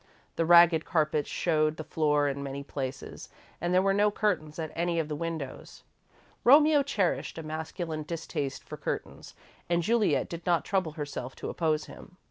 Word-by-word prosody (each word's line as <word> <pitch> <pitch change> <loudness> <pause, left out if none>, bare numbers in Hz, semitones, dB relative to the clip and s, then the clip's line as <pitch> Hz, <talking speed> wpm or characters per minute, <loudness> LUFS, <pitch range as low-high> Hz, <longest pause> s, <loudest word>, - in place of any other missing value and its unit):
The 165 - 0
ragged 170 -2 +7
carpets 155 -3 0
showed 155 -2 +1
the 155 - -5
floor 150 -2 +1
in 140 0 -3
many 140 0 -5
places, 135 -1 -6 0.3
and 175 +1 -1
there 185 +1 +4
were 195 0 +3
no 205 +1 +3
curtains 180 -8 -1
at 160 -2 -4
any 170 0 -1
of 160 -2 -1
the 150 - -2
windows. 160 -3 -6 0.6
Romeo 295 +3 +6
cherished 210 -14 -1
a 165 - -5
masculine 160 +1 -4
distaste 155 -3 -4
for - - -9
curtains - - -5 0.3
and 170 0 +2
Juliet 225 +2 +2
did 170 0 -7
not 170 -1 +1
trouble 185 -6 0
herself 145 -4 -6
to - - -6
oppose 155 -2 0
him. 180 - -13
160 Hz, 170 wpm, -28 LUFS, 150-175 Hz, 0.6 s, ragged